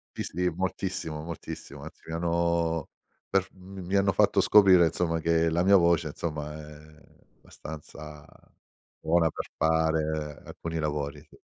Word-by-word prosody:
Sì, - - -3
sì 90 0 -1
moltissimo, 90 -3 -3
moltissimo, 85 -2 -8
anzi - - -11
mi 80 - -6
hanno 85 -1 0 0.4
per 95 -1 +2
f - - -19
m 95 +1 -13
m 90 - -7
mi 95 +3 -2
hanno 100 0 +3
fatto - - +3
scoprire, 95 -4 +6
insomma, 85 0 0
che 85 0 +2
la 85 +2 +1
mia 100 +1 +6
voce, 85 -3 +3
insomma, 75 -1 -5
è 75 0 -13 0.4
abbastanza 75 -1 -10 0.7
buona 80 0 +2
per - - -6
fare 80 -2 0
alcuni 80 -1 -5
lavori. 75 -1 -3
Sì. 75 - -20
80 Hz, 150 wpm, -27 LUFS, 75-85 Hz, 0.7 s, scoprire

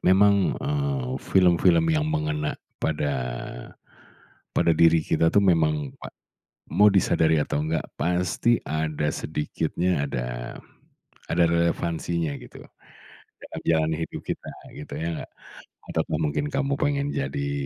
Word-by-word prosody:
memang, 100 +1 +4
eee, 140 -2 -2
film-film 90 -2 +4
yang 75 0 +1
mengena 75 -1 -1 0.2
pada 75 -2 0 1.4
pada 85 - +4
diri 80 0 +5
kita 80 - +2
tuh, 100 - +5
memang 75 -6 +2
pa - - -7 0.6
mau 105 - +5
disadari 80 -4 +3
atau 75 - -1
enggak, 80 -1 0 0.2
pasti 90 +7 +1
ada 80 -1 -1
sedikitnya 80 +1 -1
ada - - -4 0.8
ada - - +3
relevansinya 85 -2 0
gitu. - - -12 0.8
Karena - - -9
jalan 80 -1 +3
hidup 80 - -5
kita, - - -5 0.2
gitu, 75 - -9
ya 80 +2 -3
nggak, - - -10 0.6
ataupun 75 - -1
mungkin 110 - -1
kamu 140 +1 0
pengen 145 -1 +1
jadi 70 +1 -2
80 Hz, 120 wpm, -25 LUFS, 75-95 Hz, 1.4 s, diri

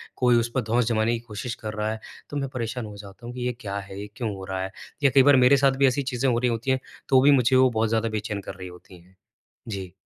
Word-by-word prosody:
कोई 125 -1 +3
उस 115 0 -1
पर - - +2
धौंस 120 0 +3
जमाने 110 0 +1
की 120 - -1
कोशिश 115 0 -6
कर 110 -1 -4
रहा 110 0 -2
है 110 - -5 0.3
तो 145 - -4
मैं 135 -2 -2
परेशान 115 -1 -3
हो 105 -1 -9
जाता 100 +3 -12
हूँ 120 - -6
कि 125 - -6
ये 125 - -1
क्या 100 -4 -4
है, 95 0 -7
ये 105 - -8
क्यों 110 -1 -3
हो 95 0 -8
रहा 95 0 -2
है? 95 - -5 0.3
या 140 - +6
कई 135 - +8
बार 145 +1 +6
मेरे 140 +3 +6
साथ 135 0 +4
भी 140 - +6
ऐसी 135 +2 0
चीज़ें 130 0 0
हो 115 - +2
रही 125 0 +1
होती 115 +3 -1
हैं 130 - +1 0.3
तो 130 -1 +6
भी 145 +2 +6
मुझे 130 -1 +4
वो 130 0 +6
बहुत 110 -2 0
ज़्यादा 115 0 0
बेचैन 105 -1 -3
कर - - -6
रही 95 -1 -8
होती 90 0 -14
हैं। 90 +2 -23 0.5
जी। 95 -4 -6
115 Hz, 290 wpm, -25 LUFS, 105-130 Hz, 0.5 s, कई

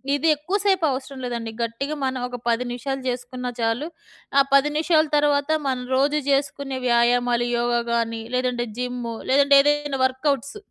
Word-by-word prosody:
ఇది 285 +3 0
ఎక్కువ 345 +8 -2
సేపు 380 -5 +3
అవసరం 265 +1 -5
లేదండి. 235 -2 -4
గట్టిగా 275 +6 -3
మనం 260 -1 -2
ఒక 250 - -7
10 230 +2 +1
నిమిషాలు 270 +2 -4
జేసుకున్నా 250 0 -4
చాలు. 230 +6 0 0.5
ఆ - - +8
10 275 +2 +5
నిమిషాలు 310 0 +2
తర్వాత 290 0 +2 0.2
మనం 255 -1 -1
రోజూ 285 +3 +2
జేసుకునే 275 -1 -1
వ్యాయామాలు 240 0 +2
యోగా 240 0 +1
గానీ, 230 -1 -1
లేదంటే 250 -1 0
జిమ్ 250 0 -3 0.3
లేదంటే 280 +1 +6
ఏదైనా 290 -2 0
వర్కౌట్స్. 275 - -1
260 Hz, 150 wpm, -23 LUFS, 245-285 Hz, 0.5 s, ఆ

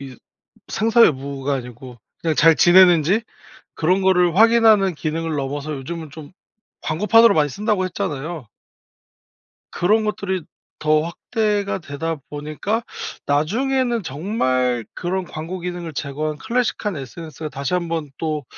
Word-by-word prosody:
이 135 -3 -9 0.5
생사 225 +2 +4
여부가 140 0 -1
아니고 125 -1 -7 0.2
그냥 160 -2 -1
잘 165 +2 +6
지내는지 175 +2 +5 0.5
그런 180 +4 +1
거를 180 -3 +3
확인하는 220 -4 +5
기능을 160 +1 -3
넘어서 145 +2 -3
"요즘은 160 +4 -6
좀 150 +1 -11 0.5
광고판으로 210 +6 +4
많이 150 -2 +2
쓴다."고 205 +3 0
했잖아요. 155 -4 -4 1.2
그런 215 +5 +2
것들이 195 -4 -2 0.4
더 155 0 +3
확대가 205 +4 -1
되다 165 +1 -4
보니까 155 +10 -3 0.4
나중에는 235 - +1
정말 130 - -1
그런 185 +1 -2
'광고 170 +3 -6
기능을 175 -2 -5
제거한 150 +2 -3
클래식한 230 -2 -1
SNS가 155 +3 -7
다시 140 +3 -4
한번 165 -4 -2
또 155 -2 -2
165 Hz, 295 characters per minute, -21 LUFS, 145-195 Hz, 1.2 s, 잘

